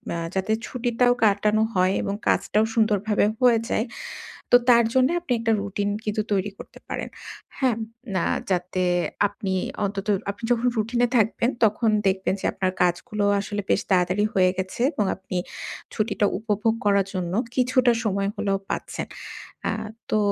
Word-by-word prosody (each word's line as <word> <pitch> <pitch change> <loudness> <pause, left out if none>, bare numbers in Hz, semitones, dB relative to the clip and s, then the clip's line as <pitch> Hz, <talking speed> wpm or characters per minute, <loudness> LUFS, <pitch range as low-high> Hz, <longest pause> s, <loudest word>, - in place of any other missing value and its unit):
আ - - -2 0.2
যাতে 190 +3 0 0.2
ছুটিটাও 245 0 +2
কাটানো 210 +1 +3
হয় 185 +1 +3
এবং 200 - -2
কাজটাও 215 +1 +2
সুন্দরভাবে 215 -2 +2 0.2
হয়ে 240 -3 +5
যায়। 220 - +1 0.7
তো 245 - +9
তার 235 -1 +7
জন্য 260 0 +5
আপনি 345 -7 -3
একটা 225 -1 +1
রুটিন 200 0 -2 0.2
কিন্তু 215 0 0
তৈরি 200 0 +1
করতে - - -11
পারেন। - - -4 0.5
হ্যাঁ? 255 -5 +2 0.4
না 185 - +1 0.3
যাতে 185 0 0 0.5
আপনি 200 -2 -4 0.3
অন্তত 200 0 -3 0.2
আপনি 200 +3 -9
যখন 240 +1 +1
রুটিনে 235 +3 +1
থাকবেন 230 +2 +2
তখন 220 +1 +2 0.2
দেখবেন 190 0 +1
যে - - -10
আপনার 185 -1 -1
কাজগুলো 205 +4 0 0.2
আসলে 205 +1 -3
বেশ - - +3
তাড়াতাড়ি 185 +2 +3
হয়ে 185 -1 +4
গেছে 190 - +1
আ - - -20 0.3
এবং 210 - 0
আপনি 190 -1 -6 0.6
ছুটিটা 215 -1 +1
উপভোগ 215 +1 0
করার 200 -1 +3
জন্য 180 -2 -2 0.2
কিছুটা 255 -1 +3
সময় 200 -1 0
হলেও 195 -1 0
পাচ্ছেন। - - -3 0.6
আ - - +1 0.4
তো 215 - +3
210 Hz, 155 wpm, -24 LUFS, 195-230 Hz, 0.7 s, তো